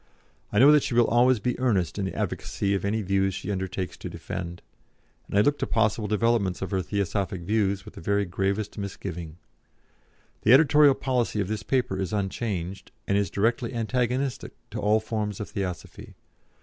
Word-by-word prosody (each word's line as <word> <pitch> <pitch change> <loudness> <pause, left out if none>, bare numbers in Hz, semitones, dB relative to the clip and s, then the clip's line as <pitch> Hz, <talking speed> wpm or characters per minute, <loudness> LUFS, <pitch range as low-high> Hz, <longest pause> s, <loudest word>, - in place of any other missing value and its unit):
I - - -1
know 135 +6 +8
that 150 -1 +6
she 120 - -2
will 120 -1 +5
always 120 +1 +4
be 125 +3 -2
earnest 100 - +1
in 100 - -1
the 95 - -4
advocacy 100 0 -2
of 95 - -1
any 105 +2 0
views 95 0 +1
she 105 - -4
undertakes 95 -1 -3
to - - -7
defend, 85 0 -6 0.6
and - - -2
I - - +7
look 145 +6 +2
to - - -1
possible 110 -1 +1
developments 105 -3 +1
of 95 - -5
her 95 -1 +1
Theosophic 100 -1 -2
views 100 0 0
with - - -11
the - - -10
very 100 +3 +1
gravest 100 +4 -2
misgiving. 90 -5 -6 1.0
The 110 - +5
editorial 145 0 +6
policy 125 -5 -1
of 100 -1 -1
this 110 0 -2
paper 125 -8 0
is 95 -1 -2
unchanged, 100 -2 -3 0.2
and 100 - +1
is 100 -3 +1
directly 115 +5 0
antagonistic 125 +2 -1 0.2
to - - -4
all 105 +1 +3
forms 105 -2 -3
of 105 - -6
Theosophy. 95 -5 -6
105 Hz, 180 wpm, -26 LUFS, 95-120 Hz, 1.0 s, know